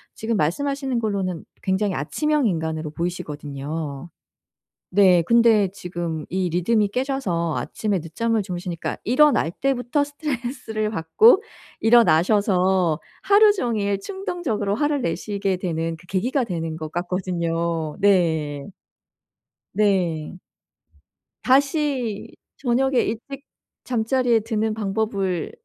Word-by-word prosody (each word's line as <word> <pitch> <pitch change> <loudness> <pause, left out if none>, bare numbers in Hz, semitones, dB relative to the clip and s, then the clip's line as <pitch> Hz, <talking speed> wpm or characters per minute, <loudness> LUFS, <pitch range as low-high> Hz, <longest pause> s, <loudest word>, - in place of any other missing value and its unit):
지금 225 +1 -2
말씀하시는 270 - -1
걸로는 195 -6 -2 0.2
굉장히 190 +1 0
아침형 295 - 0
인간으로 160 -4 -2
보이시거든요. 150 -2 -5 0.8
네. 185 -3 +5
근데 225 0 +4
지금 170 -4 -5
이 185 -1 -1
리듬이 205 +5 +2
깨져서 205 - -1
아침에 205 -4 -2
늦잠을 220 +8 -1
주무시니까 180 -3 -4
일어날 260 - +4
때부터 270 - 0
스트레스를 250 -7 -4
받고 300 - +4 0.4
일어나셔서 190 -4 +3 0.2
하루 410 +2 +6
종일 210 - -1
충동적으로 345 - -3
화를 290 +4 0
내시게 195 +1 -2
되는 165 -2 -2
그 170 +3 -19
계기가 240 +10 0
되는 165 -6 -4
것 155 -1 -6
같거든요. 170 -3 -2
네. 160 -7 +1 1.0
네. 180 -6 0 1.1
다시 270 -5 +1 0.2
저녁에 260 0 +1
일찍 260 +5 -5 0.4
잠자리에 240 -1 +1
드는 220 0 -1
방법을 200 -4 -2
200 Hz, 260 characters per minute, -23 LUFS, 170-240 Hz, 1.1 s, 하루